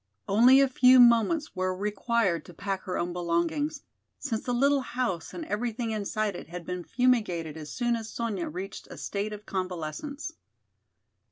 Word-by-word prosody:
Only 240 +7 +6
a 275 - +5
few 255 0 +6
moments 240 +6 +4
were 185 0 -1
required 210 -2 0
to 175 - -13
pack 195 +1 -3
her 185 - -2
own 175 0 -2
belongings, 175 - -1 0.3
since 230 -6 -3
the 245 - -2
little 275 +3 +3
house 245 -10 -3
and 330 - -6
everything 230 -1 -2
inside 215 -1 -1
it - - -8
had 175 +1 -8
been 180 0 -4
fumigated 210 - +1
as 155 -2 -8
soon 240 -2 0
as 225 -1 -5
Sonya 220 -7 -3
reached 185 +5 -7
a - - -9
state 205 +1 -3
of 210 0 -8
convalescence. 185 - -4
215 Hz, 165 wpm, -28 LUFS, 180-250 Hz, 0.3 s, Only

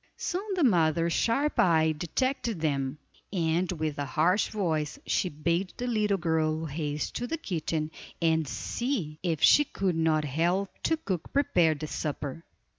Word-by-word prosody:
Soon 390 +3 -3
the 355 - +1
mother's 170 - +3
sharp 280 +6 +1
eye 160 -3 +4
detected 230 - -1
them, 140 -3 -1 0.3
and 175 -1 +1
with 155 -3 -3
a 145 - -1
harsh 170 +9 +2
voice 160 - -1
she 185 - +1
bade 170 +5 -1
the 245 - -3
little 210 -4 +1
girl 160 -2 0
haste 150 0 -3
to 245 - -3
the 330 - -2
kitchen, 160 - -2 0.3
and 160 -2 +2
see 195 - -3
if 165 -4 -1
she 295 - +7
could 190 - -1
not 160 -1 +2
help 175 +7 0
the 320 - +1
cook 185 - -4
prepare 175 - +3
the 150 - -5
supper. 150 0 -4
165 Hz, 155 wpm, -28 LUFS, 155-200 Hz, 0.3 s, she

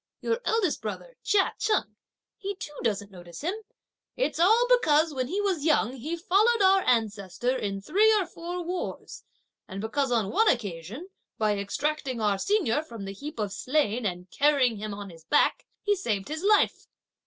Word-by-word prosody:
your 465 +1 -1
eldest 435 -8 +1
brother, - - -6
Chia 400 -2 +2
Cheng, 425 0 0 0.4
he 400 0 -5
too 300 -5 -8
doesn't 205 -3 -1
notice 175 -2 -11
him. 340 +6 -1 0.6
It's - - -1
all 440 +8 +5
because 320 -11 +4
when 255 -2 -2
he 380 +9 -2
was 375 -7 0
young 295 -6 +2
he 310 +7 -4
followed 415 +7 +3
our 385 0 +5
ancestor 220 +1 0
in 200 -5 -3
three 415 - +4
or 380 - -1
four 345 +1 -6
wars, 355 +2 -5 0.4
and 190 - -7
because 255 +5 -1
on 220 -5 +1
one 445 +3 +3
occasion, 215 - -2 0.3
by 215 -1 +1
extracting 265 +5 -2
our 205 -3 +1
senior 300 - +1
from 230 -9 -9
the 195 - -5
heap 290 +8 -8
of 205 -3 -2
slain 250 -1 0
and 180 -1 -5
carrying 275 -6 +3
him 215 +1 -5
on 200 -2 -8
his 165 -1 -15
back, 295 - +2 0.2
he 410 -1 +2
saved 215 - -2
his 315 +1 -4
life. 415 +2 +2
285 Hz, 175 wpm, -27 LUFS, -, 0.6 s, all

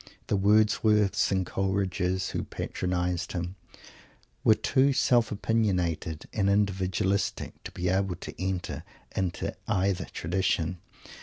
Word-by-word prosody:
The - - +3
Wordsworths 105 0 +3
and 95 -1 +1
Coleridges 95 -1 -1
who - - -2
patronized 90 0 -2
him 90 +1 -3 0.9
were 110 - +6
too 130 +5 +3
self 120 -4 +3
opiniated 90 -8 0
and 100 -2 +2
individualistic 95 -1 0
to - - -6
be 90 - -3
able 95 0 +1
to - - -8
enter 95 -2 -3 0.3
into 95 -3 -2
either 95 -3 +1
tradition. 90 0 -1
95 Hz, 110 wpm, -28 LUFS, 90-105 Hz, 0.9 s, were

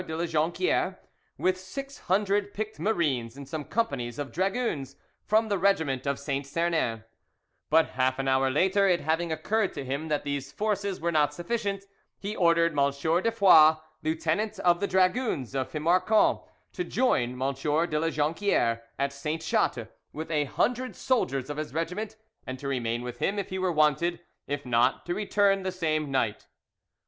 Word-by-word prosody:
de 160 - -4
La 170 - 0
Jonquiere, 165 - 0 0.4
with 185 0 +1
six 275 +9 -7
hundred 205 +1 +1
picked 215 +1 -4
marines 140 - 0
and 140 -1 -9
some 155 +1 -4
companies 140 - -2
of 145 -4 -4
dragoons 185 - -1 0.3
from 220 +1 +2
the 200 -3 0
regiment 160 -9 +1
of 140 -1 0
Saint 140 -1 -3
Sernin, 160 -8 0 0.7
but 160 +1 +4
half 130 0 0
an 135 0 -2
hour 135 0 +3
later, 190 +8 +3
it 180 -2 +2
having 165 +2 0
occurred 200 +7 0
to 135 - -5
him 140 +5 -3
that 150 -2 -1
these 140 -1 -3
forces 200 +1 -2
were 170 +1 0
not 150 -2 +2
sufficient, 200 +2 -2 0.3
he 205 +2 -5
ordered 170 -3 +3
M. 140 -1 +3
de 165 +9 0
Foix, 165 -8 +7 0.3
lieutenant 165 +7 -1
of 175 -1 +3
the 200 - 0
dragoons 185 - +1
of 130 -1 -2
Fimarqon, 180 +8 +3 0.3
to 360 - -2
join 125 - 0
M. 135 +1 0
de 150 +3 0
La 165 +1 +1
Jonquiere 150 - +1 0.2
at 140 0 -1
Sainte 150 +3 -4
Chatte - - 0 0.2
with 160 +2 -6
a 150 -2 +1
hundred 250 - -1
soldiers 140 - 0
of 145 0 -5
his 155 -2 -5
regiment, 190 +7 -3 0.3
and 130 - -4
to 140 - -6
remain 120 -3 -1
with 125 0 -7
him 200 - 0
if 200 - -3
he 190 - -2
were 185 -1 +1
wanted; 155 +2 +2 0.3
if 145 0 -3
not, 125 +1 +2
to 175 - -1
return 200 0 +2
the 185 0 -2
same 155 -5 -1
night. 120 -6 -1
160 Hz, 175 wpm, -27 LUFS, 140-195 Hz, 0.7 s, Foix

